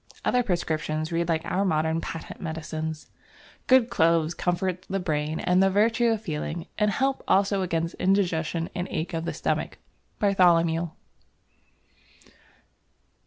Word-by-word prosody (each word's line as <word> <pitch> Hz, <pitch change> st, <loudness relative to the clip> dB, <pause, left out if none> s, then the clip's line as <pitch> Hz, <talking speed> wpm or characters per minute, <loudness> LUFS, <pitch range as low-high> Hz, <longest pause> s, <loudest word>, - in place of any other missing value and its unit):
Other 250 Hz, -, +3 dB
prescriptions 155 Hz, -5 st, -2 dB
read 170 Hz, 0 st, -1 dB
like 160 Hz, -1 st, 0 dB
our 195 Hz, -, 0 dB
modern 160 Hz, -2 st, +1 dB
patent 165 Hz, -, -7 dB
medicines. 160 Hz, -1 st, -5 dB, 0.6 s
"Good 255 Hz, -2 st, +5 dB
Cloves 165 Hz, 0 st, +3 dB
comfort 180 Hz, +1 st, -1 dB
the 195 Hz, -, -1 dB
Brain 155 Hz, -3 st, -2 dB
and 180 Hz, +1 st, +2 dB
the 195 Hz, -, +5 dB
Virtue 225 Hz, +4 st, +3 dB
of 225 Hz, -2 st, 0 dB
Feeling, 160 Hz, -1 st, -4 dB
and 210 Hz, 0 st, +3 dB
help 270 Hz, +5 st, 0 dB
also 195 Hz, 0 st, +3 dB
against 165 Hz, -2 st, -1 dB
Indigestion 170 Hz, -4 st, 0 dB
and 175 Hz, +1 st, -3 dB
Ache 165 Hz, +3 st, -3 dB
of 165 Hz, 0 st, -2 dB
the -, -, -1 dB
Stomach" -, -, -2 dB, 0.4 s
(Bartholomew). 170 Hz, -4 st, +3 dB
170 Hz, 130 wpm, -26 LUFS, 160-195 Hz, 0.6 s, Good